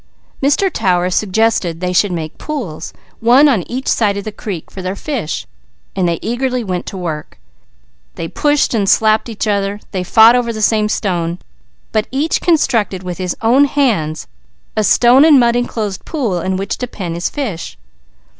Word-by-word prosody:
Mr. 300 Hz, +7 st, +2 dB
Tower 180 Hz, -3 st, +1 dB
suggested 195 Hz, -4 st, +1 dB
they 180 Hz, 0 st, -2 dB
should 195 Hz, +2 st, +2 dB
make 160 Hz, -3 st, -5 dB
pools, 240 Hz, -, -5 dB, 0.3 s
one 250 Hz, +6 st, +5 dB
on 245 Hz, -10 st, +2 dB
each 255 Hz, +2 st, -4 dB
side 205 Hz, -3 st, +1 dB
of 200 Hz, -, -4 dB
the 215 Hz, -, -5 dB
creek, 200 Hz, -5 st, -7 dB
for 190 Hz, -, -7 dB
their 185 Hz, +1 st, -3 dB
fish, 235 Hz, -, -4 dB, 0.5 s
so -, -, -2 dB
they 170 Hz, -1 st, +1 dB
eagerly 250 Hz, +1 st, -1 dB
went 180 Hz, -4 st, -4 dB
to 195 Hz, -, -6 dB
work. 160 Hz, -4 st, -5 dB, 0.8 s
They 165 Hz, -, -4 dB
pushed 295 Hz, -, +1 dB
and 200 Hz, -4 st, +1 dB
slapped 220 Hz, +1 st, +3 dB
each 225 Hz, -1 st, -3 dB
other, 200 Hz, -1 st, -1 dB
they 185 Hz, -2 st, -2 dB
fought 225 Hz, +5 st, +6 dB
over 245 Hz, -1 st, 0 dB
the 220 Hz, -, -6 dB
same 215 Hz, 0 st, +2 dB
stone, 175 Hz, -5 st, -1 dB, 0.5 s
but 215 Hz, -1 st, 0 dB
each 285 Hz, +5 st, 0 dB
constructed 235 Hz, -, +1 dB
with 180 Hz, 0 st, -6 dB
his 180 Hz, -2 st, -3 dB
own 255 Hz, +6 st, +5 dB
hands 215 Hz, -, 0 dB, 0.5 s
a 215 Hz, -, +1 dB
stone 245 Hz, +6 st, +5 dB
and 305 Hz, -4 st, +7 dB
mud 235 Hz, -1 st, +3 dB
enclosed 220 Hz, -5 st, -2 dB
pool 235 Hz, -, -2 dB
in 190 Hz, +1 st, -1 dB
which 195 Hz, +1 st, -3 dB
to 250 Hz, -, -3 dB
pen 185 Hz, -7 st, -5 dB
his 170 Hz, +1 st, -2 dB
fish. 220 Hz, -, -5 dB
215 Hz, 175 wpm, -16 LUFS, 180-245 Hz, 0.8 s, and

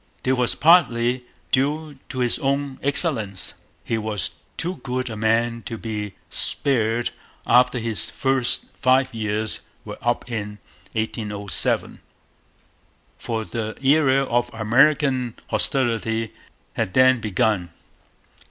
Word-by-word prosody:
This 130 Hz, +1 st, +2 dB
was 125 Hz, -2 st, +1 dB
partly 125 Hz, -7 st, +4 dB, 0.3 s
due 145 Hz, +2 st, 0 dB
to 130 Hz, 0 st, -5 dB
his 120 Hz, -1 st, 0 dB
own 140 Hz, 0 st, -1 dB
excellence: 135 Hz, -, -1 dB, 0.3 s
he 115 Hz, -, -1 dB
was 105 Hz, -4 st, -2 dB, 0.3 s
too 175 Hz, +2 st, -2 dB
good 130 Hz, -1 st, -3 dB
a -, -, -5 dB
man 115 Hz, +2 st, +1 dB
to 115 Hz, -, -5 dB
be 105 Hz, -3 st, -5 dB
spared 120 Hz, -3 st, +1 dB, 0.3 s
after 125 Hz, +1 st, +4 dB
his 115 Hz, -2 st, -2 dB
first 135 Hz, -2 st, +1 dB
five 130 Hz, -1 st, +2 dB
years 110 Hz, 0 st, -2 dB, 0.3 s
were -, -, -8 dB
up 120 Hz, +1 st, -1 dB
in 105 Hz, -3 st, -4 dB, 0.4 s
1807; 105 Hz, -3 st, 0 dB, 1.2 s
for 110 Hz, -1 st, -3 dB
the 110 Hz, -1 st, -4 dB
era 135 Hz, -1 st, +4 dB
of 120 Hz, -1 st, 0 dB
American 130 Hz, +2 st, +2 dB, 0.2 s
hostility 115 Hz, -4 st, +2 dB, 0.4 s
had 90 Hz, -, -2 dB
then 130 Hz, -1 st, +5 dB
begun. 105 Hz, -3 st, 0 dB
120 Hz, 115 wpm, -22 LUFS, 110-135 Hz, 1.2 s, then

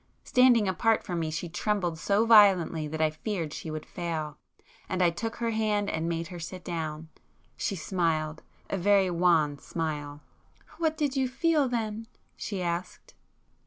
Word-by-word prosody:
Standing 250 Hz, -4 st, +4 dB
apart 220 Hz, +5 st, +2 dB
from 175 Hz, -3 st, -3 dB
me 160 Hz, -1 st, -1 dB
she 155 Hz, +3 st, -3 dB
trembled 175 Hz, -1 st, -1 dB
so 200 Hz, +5 st, +2 dB
violently 190 Hz, -8 st, +5 dB
that 155 Hz, +1 st, -4 dB
I 155 Hz, -, +2 dB
feared 165 Hz, -2 st, -4 dB
she 160 Hz, -, -6 dB
would 155 Hz, 0 st, -5 dB
fail,—and 165 Hz, +2 st, -6 dB
I 175 Hz, -2 st, +4 dB
took 225 Hz, +7 st, -4 dB
her 230 Hz, -1 st, -1 dB
hand 215 Hz, -2 st, 0 dB
and 160 Hz, +1 st, -2 dB
made 165 Hz, -1 st, -3 dB
her 175 Hz, -, -7 dB
sit 180 Hz, +2 st, -7 dB
down. 160 Hz, -2 st, -4 dB, 0.5 s
She 195 Hz, -, -2 dB
smiled,—a 160 Hz, 0 st, -2 dB
very 195 Hz, 0 st, +3 dB
wan 165 Hz, -5 st, +2 dB
smile. 150 Hz, -3 st, -4 dB, 0.6 s
"What 320 Hz, -2 st, +1 dB
did 290 Hz, -3 st, 0 dB
you 265 Hz, -1 st, +1 dB
feel 295 Hz, +1 st, +1 dB
then?" 225 Hz, -2 st, -3 dB, 0.3 s
she 195 Hz, -4 st, -4 dB
asked. 175 Hz, +1 st, -4 dB
180 Hz, 155 wpm, -28 LUFS, 160-215 Hz, 0.6 s, violently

